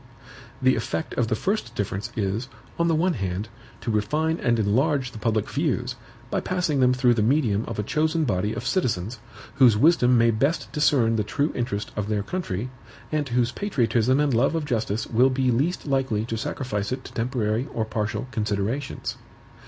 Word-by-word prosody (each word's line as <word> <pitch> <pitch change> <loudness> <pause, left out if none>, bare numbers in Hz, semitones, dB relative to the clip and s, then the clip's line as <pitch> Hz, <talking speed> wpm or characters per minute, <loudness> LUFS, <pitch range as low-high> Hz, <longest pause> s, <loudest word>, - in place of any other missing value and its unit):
The 130 0 +5
effect 80 -8 -3
of 120 - +1
the 110 - +1
first 155 - -2
difference 100 +2 -3
is, 105 +5 -1 0.3
on 170 - +3
the 165 - +3
one 175 +3 +2
hand, 95 - -3 0.3
to 115 - -2
refine 155 +10 0
and 120 -1 +2
enlarge 130 +5 +1
the 110 - -9
public 110 -2 0
views, - - -1 0.4
by - - +1
passing 180 -6 0
them 125 -1 +5
through 125 -1 +3
the 115 - +1
medium 115 -3 +2
of 115 - -5
a 105 - -1
chosen 155 - +1
body 105 -5 0
of - - -5
citizens, 115 - -1 0.4
whose 120 -6 +6
wisdom 125 -3 +5
may 115 0 +5
best 140 +9 0
discern 130 -7 +3
the 105 - +1
true 145 +8 0
interest 105 -4 -3
of 105 -1 -2
their 105 -2 0
country, 125 - -3 0.4
and 150 -3 -1
whose 120 0 +1
patriotism 130 - +1
and 145 -3 +2
love 125 +7 +2
of 160 -2 -1
justice 115 -4 -1
will 125 +3 +3
be 130 -1 +1
least 145 +10 0
likely 135 -6 0
to 115 - -3
sacrifice 110 -2 -3
it 130 0 -3
to - - -11
temporary 115 0 -1
or 110 - -1
partial 110 +2 -2
considerations. 110 +5 -2
120 Hz, 185 wpm, -25 LUFS, 110-140 Hz, 0.4 s, whose